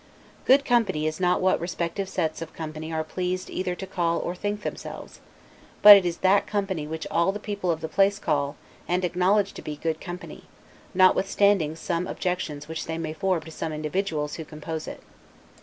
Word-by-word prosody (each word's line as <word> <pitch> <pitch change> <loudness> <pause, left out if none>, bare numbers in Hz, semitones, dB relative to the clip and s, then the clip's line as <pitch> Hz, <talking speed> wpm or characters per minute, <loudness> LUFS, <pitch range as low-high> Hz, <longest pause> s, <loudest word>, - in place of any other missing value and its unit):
Good 275 +2 +5
company 230 - +2
is 155 +1 -2
not 180 -1 +2
what 185 0 +3
respective 175 +2 -3
sets 160 -3 -2
of 165 -1 -7
company 155 0 -6
are 160 0 -1
pleased 185 +2 -3
either 180 -1 -2
to 190 - -6
call 170 -3 0
or 175 - -2
think 205 +3 -3
themselves, - - -7 0.6
but 205 0 +13
it 190 -3 +3
is 170 - -2
that 195 +2 +4
company 195 -7 -2
which 160 +1 -5
all 170 +3 +3
the 205 - -6
people 200 -3 -3
of 160 -2 0
the - - -3
place 200 +3 +3
call, 145 -6 -1 0.3
and 180 +1 +1
acknowledge 190 +3 +2
to - - -9
be, 150 - -5
good 160 +1 -3
company, 180 +1 -8 0.5
notwithstanding 190 -3 +3
some 170 +2 -2
objections 180 -5 -3
which 160 0 -5
they 160 0 -3
may 160 -1 -3
form 180 +1 0
to 160 - -11
some 160 - -4
of - - -5
the - - -3
individuals 155 -1 -2
who 160 - -5
compose 155 +1 -6
it. - - -8
175 Hz, 195 wpm, -26 LUFS, 160-195 Hz, 0.6 s, but